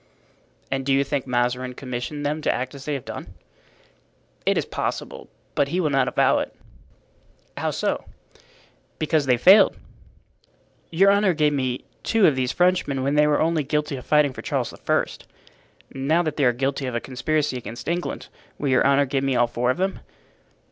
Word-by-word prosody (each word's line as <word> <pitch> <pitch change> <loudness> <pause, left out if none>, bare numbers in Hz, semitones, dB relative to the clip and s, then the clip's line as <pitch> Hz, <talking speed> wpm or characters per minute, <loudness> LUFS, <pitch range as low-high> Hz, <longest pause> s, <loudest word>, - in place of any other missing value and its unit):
"And 135 0 -1
do 135 - -1
you 135 +1 +3
think 140 -1 -3
Mazarin 125 +1 -1
commissioned 135 +3 -5
them 150 +2 -1
to - - +1
act 130 +2 -3
as 140 -1 -10
they 150 - -1
have 135 - -6
done?" - - -8 1.1
"It - - +3
is - - 0
possible. - - -4 0.2
But 140 - +1
he 175 +6 -1
will 155 -5 +1
not 135 -2 +2
avow - - +3
it." - - -5 1.0
"How - - -1
so?" - - -2 0.9
"Because 155 -2 0
they 125 -1 +4
failed." 190 - +6 1.1
"Your 195 +4 +4
honor 200 -3 +3
gave 150 -1 +2
me 130 -3 -2 0.2
two 225 -3 +3
of 150 - +4
these 130 -1 0
Frenchmen 175 -7 +1
when 140 +1 0
they 150 0 +4
were 150 - +2
only 160 -1 +1
guilty 150 +1 -1
of 125 - -7
fighting 150 -3 +3
for - - -8
Charles - - -2
I. - - 0 0.9
Now 150 +6 +1
that 155 -3 -2
they 145 - +1
are 125 - +5
guilty 135 +2 -2
of 125 - -4
a - - +1
conspiracy 140 +3 -1
against 120 -1 -7
England 175 +1 -3 0.3
will 145 - -2
your 130 +1 +4
honor 140 0 +4
give 135 0 -1
me 135 -1 +1
all 120 0 +4
four 120 +1 -1
of 130 - +1
them?" 190 +1 -1
140 Hz, 185 wpm, -23 LUFS, 130-155 Hz, 1.1 s, failed